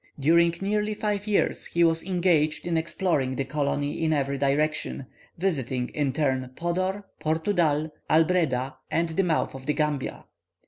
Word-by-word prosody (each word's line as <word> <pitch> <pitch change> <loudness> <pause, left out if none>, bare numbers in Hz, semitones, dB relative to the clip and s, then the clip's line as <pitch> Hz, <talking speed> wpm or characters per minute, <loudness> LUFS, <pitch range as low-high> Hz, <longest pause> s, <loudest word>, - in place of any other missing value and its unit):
During 170 +4 +4
nearly 210 +2 0
five 210 -1 -2
years 210 - +1
he 170 - +2
was 165 -1 +3
engaged 175 -4 +1
in 170 -1 0
exploring 160 -5 0
the 135 - -1
colony 145 +2 -1
in 160 0 +2
every 140 -2 0
direction, 145 0 0 0.3
visiting 135 -9 -1
in 145 -3 -1
turn 130 -3 0
Podor, 185 +4 -1 0.2
Portudal, 160 -2 +1 0.2
Albreda, 155 -6 +2
and 165 0 +1
the 160 +4 +1
mouth 170 -4 0
of 135 0 -10
the 150 - +2
Gambia. 150 -3 -2
160 Hz, 145 wpm, -26 LUFS, 140-175 Hz, 0.3 s, During